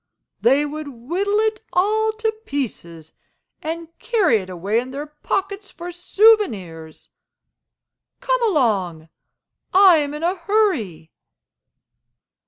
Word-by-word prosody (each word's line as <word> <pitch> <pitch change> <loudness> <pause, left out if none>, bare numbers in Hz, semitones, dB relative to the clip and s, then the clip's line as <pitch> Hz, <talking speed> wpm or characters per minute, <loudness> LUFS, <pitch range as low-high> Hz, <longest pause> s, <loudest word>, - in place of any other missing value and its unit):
They 275 +5 +3
would 300 +1 -6
whittle 340 - -2
it 440 0 -1
all 430 +4 +2
to 445 0 -1 0.2
pieces, 170 - -5 0.5
and 330 +1 -5
carry 420 - +2
it 185 -1 -9
away 190 +5 -1
in 250 +2 -6
their 280 +3 -5
pockets 390 +7 -4
for 350 0 -8
souvenirs. 340 - +1 1.1
Come - - 0
along; 200 - 0 0.7
I 380 -3 +7
am 290 -1 -2
in 300 - -6
a 350 +2 +2
hurry." 330 - -1
310 Hz, 110 wpm, -21 LUFS, -, 1.1 s, I